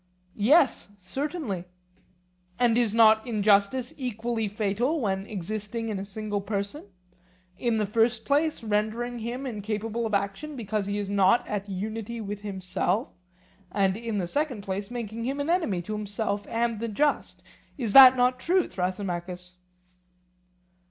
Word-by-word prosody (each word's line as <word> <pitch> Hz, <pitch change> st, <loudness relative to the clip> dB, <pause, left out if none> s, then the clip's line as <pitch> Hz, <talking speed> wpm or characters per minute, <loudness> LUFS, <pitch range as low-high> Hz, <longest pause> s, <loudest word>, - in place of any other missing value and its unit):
Yes, 245 Hz, -2 st, +3 dB
certainly. 225 Hz, -, -4 dB, 0.9 s
And 240 Hz, -2 st, +3 dB
is 235 Hz, -3 st, +2 dB
not 220 Hz, 0 st, +5 dB
injustice 215 Hz, +3 st, +2 dB
equally 235 Hz, -3 st, -2 dB
fatal 215 Hz, +9 st, 0 dB
when 195 Hz, -4 st, -1 dB
existing 215 Hz, +3 st, -4 dB
in 205 Hz, -3 st, -2 dB
a 195 Hz, -, -5 dB
single 205 Hz, 0 st, -3 dB
person; 200 Hz, +6 st, -4 dB, 0.7 s
in 235 Hz, -3 st, +1 dB
the 215 Hz, -, +1 dB
first 225 Hz, +2 st, +1 dB
place 295 Hz, -1 st, +1 dB
rendering 220 Hz, +3 st, -1 dB
him 240 Hz, +4 st, -4 dB
incapable 220 Hz, 0 st, -3 dB
of 215 Hz, -, 0 dB
action 200 Hz, +10 st, -3 dB
because 215 Hz, -4 st, -2 dB
he 200 Hz, 0 st, -1 dB
is 205 Hz, -1 st, -2 dB
not 200 Hz, +3 st, +3 dB
at 205 Hz, -1 st, -3 dB
unity 220 Hz, +4 st, -4 dB
with 205 Hz, -1 st, -5 dB
himself, 190 Hz, +2 st, -2 dB, 0.6 s
and 195 Hz, -1 st, +2 dB
in 225 Hz, -1 st, -3 dB
the 185 Hz, -, 0 dB
second 270 Hz, -, -2 dB
place 195 Hz, +1 st, -4 dB
making 230 Hz, -2 st, -5 dB
him 275 Hz, +3 st, -2 dB
an 285 Hz, +4 st, 0 dB
enemy 220 Hz, -, 0 dB
to 215 Hz, -, -5 dB
himself 205 Hz, 0 st, -3 dB
and 230 Hz, -1 st, 0 dB
the 230 Hz, -, -2 dB
just? 285 Hz, +7 st, -1 dB, 0.3 s
Is 230 Hz, -7 st, -2 dB
not 260 Hz, -1 st, +11 dB
that 250 Hz, +1 st, +2 dB
true, 360 Hz, +5 st, +2 dB
Thrasymachus? 180 Hz, -1 st, -4 dB
215 Hz, 145 wpm, -27 LUFS, 200-240 Hz, 0.9 s, not